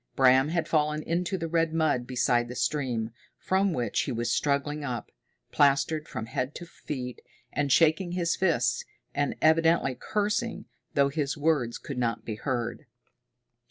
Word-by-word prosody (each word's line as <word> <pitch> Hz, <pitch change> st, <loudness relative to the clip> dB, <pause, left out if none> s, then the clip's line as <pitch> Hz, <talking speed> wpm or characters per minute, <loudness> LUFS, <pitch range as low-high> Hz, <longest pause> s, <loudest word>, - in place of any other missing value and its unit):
Bram 130 Hz, +1 st, +5 dB
had 170 Hz, 0 st, -1 dB
fallen 150 Hz, -1 st, +1 dB
into 175 Hz, +3 st, -1 dB
the 165 Hz, -, -3 dB
red 165 Hz, 0 st, +1 dB
mud 145 Hz, -7 st, +1 dB
beside 120 Hz, -1 st, +1 dB
the 125 Hz, -, -7 dB
stream, 125 Hz, -6 st, -1 dB, 0.3 s
from 190 Hz, +1 st, +1 dB
which 120 Hz, -8 st, 0 dB
he -, -, -3 dB
was 120 Hz, 0 st, -1 dB
struggling 145 Hz, +2 st, 0 dB
up, 120 Hz, -5 st, -4 dB, 0.4 s
plastered 150 Hz, +2 st, +2 dB
from 110 Hz, -, -5 dB
head 125 Hz, +4 st, -3 dB
to 175 Hz, -, -7 dB
feet, 125 Hz, -6 st, -6 dB, 0.3 s
and 145 Hz, -1 st, 0 dB
shaking 170 Hz, +4 st, +3 dB
his 175 Hz, -2 st, +1 dB
fists 125 Hz, -10 st, +1 dB, 0.3 s
and 145 Hz, 0 st, 0 dB
evidently 160 Hz, -3 st, +4 dB
cursing, 210 Hz, -, -2 dB, 0.3 s
though 140 Hz, 0 st, +4 dB
his 145 Hz, 0 st, -2 dB
words 145 Hz, -6 st, +1 dB
could 135 Hz, -3 st, -6 dB
not 115 Hz, -3 st, -1 dB
be 110 Hz, -, -3 dB
heard. 120 Hz, 0 st, -3 dB
145 Hz, 155 wpm, -28 LUFS, 125-165 Hz, 0.4 s, Bram